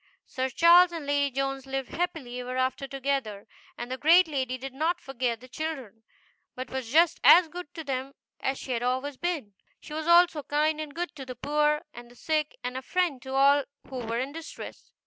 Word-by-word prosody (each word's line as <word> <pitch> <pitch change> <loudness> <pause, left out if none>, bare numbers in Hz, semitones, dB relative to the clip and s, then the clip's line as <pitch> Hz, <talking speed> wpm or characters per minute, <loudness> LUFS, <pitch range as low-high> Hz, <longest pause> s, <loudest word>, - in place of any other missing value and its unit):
Sir 260 -1 -2
Charles 340 +6 +6
and 330 -4 -6
Lady 285 0 +1
Jones 270 0 -2
lived 270 -1 -3
very - - -8
happily 255 -5 -2
together, 270 -7 -2 0.3
and 240 +1 -6
the 260 - -4
great 335 +6 +6
lady 260 -4 -2
did 265 +1 -7
not 325 +6 0
forget 245 -3 -3
the 255 - -12
children, 265 -7 -6 0.5
but 255 +1 -6
was 260 -3 -4
just 335 +3 +4
as 350 -1 +8
good 350 -2 -8
to 320 - -5
them 270 -1 -4 0.2
as 265 0 -1
she 265 - -7
had 235 -2 -1
always 260 +3 -1
been. 315 - -3 0.3
She 300 - -11
was 315 +1 -4
also 340 -2 +5
kind 305 +2 0
and 295 -2 -8
good 345 -3 -4
to 270 - -6
the 255 -1 -8
poor, 300 +3 +1
and 240 0 -11
the 245 - -17
sick, 310 +2 -1
and 250 +1 -4
a - - -4
friend 335 -3 -1
to 265 +2 -6
all 280 +1 +5 0.3
who 265 - -6
were 230 -1 -3
in 260 +3 -2
distress. 325 +1 -9
275 Hz, 205 wpm, -27 LUFS, 255-315 Hz, 0.5 s, as